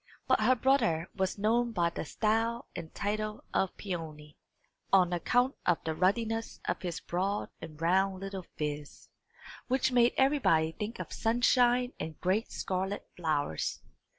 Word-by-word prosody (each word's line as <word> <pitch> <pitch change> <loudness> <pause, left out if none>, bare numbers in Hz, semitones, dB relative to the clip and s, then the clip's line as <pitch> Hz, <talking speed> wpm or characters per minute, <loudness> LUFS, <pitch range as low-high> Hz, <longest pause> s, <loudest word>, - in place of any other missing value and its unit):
But 260 - +4
her 250 +4 +5
brother 230 -11 +2
was 190 0 -1
known 230 +3 +1
by 170 -4 +1
the 170 - -5
style 225 +6 0
and 160 - -6
title 215 +1 -3
of 190 - 0
Peony, 155 -6 -6 0.6
on 180 -2 +5
account 245 - +2
of 175 -2 +3
the 160 - -1
ruddiness 225 +6 0
of - - -2
his 170 -4 -3
broad 195 +4 -2
and 155 -2 -9
round 190 +3 +2
little 195 -2 -6
phiz, 150 -1 -5 0.6
which 260 0 +2
made 245 -1 +4
everybody 265 - +3
think 210 +6 -5
of - - -6
sunshine 245 +2 +3
and 160 -1 -5
great 190 +6 0
scarlet 190 +2 -3
flowers. 150 - -1
195 Hz, 145 wpm, -31 LUFS, 170-235 Hz, 0.6 s, her